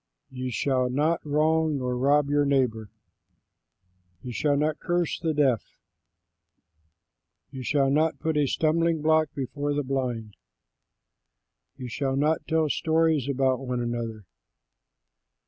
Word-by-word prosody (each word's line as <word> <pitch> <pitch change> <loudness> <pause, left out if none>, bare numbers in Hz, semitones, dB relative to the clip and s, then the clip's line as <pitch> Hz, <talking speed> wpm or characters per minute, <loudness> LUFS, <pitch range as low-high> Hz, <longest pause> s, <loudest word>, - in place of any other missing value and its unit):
You 130 0 -4
shall 130 +2 0
not 150 +6 0
wrong 155 +1 +1
nor 125 -1 -2
rob 140 +3 +3
your 145 0 +2
neighbor. 125 -6 0 1.3
You 125 - -6
shall 145 +3 +1
not 150 +1 0
curse 175 -2 -1
the 165 -2 -1
deaf. 140 -6 0 1.7
You 135 -2 -7
shall 135 +1 +1
not 155 +3 +2
put 160 -1 -2
a 145 -2 +2
stumbling 165 +1 +1
block 155 -1 +3
before 145 +2 -3
the 145 - 0
blind. 125 -5 -3 1.4
You 125 - -6
shall 135 +3 -2
not 150 +3 0
tell 160 -1 +2
stories 160 -2 +1
about 130 -1 +1
one 125 -2 -3
another. 115 -3 -4
140 Hz, 125 wpm, -26 LUFS, 125-155 Hz, 1.7 s, rob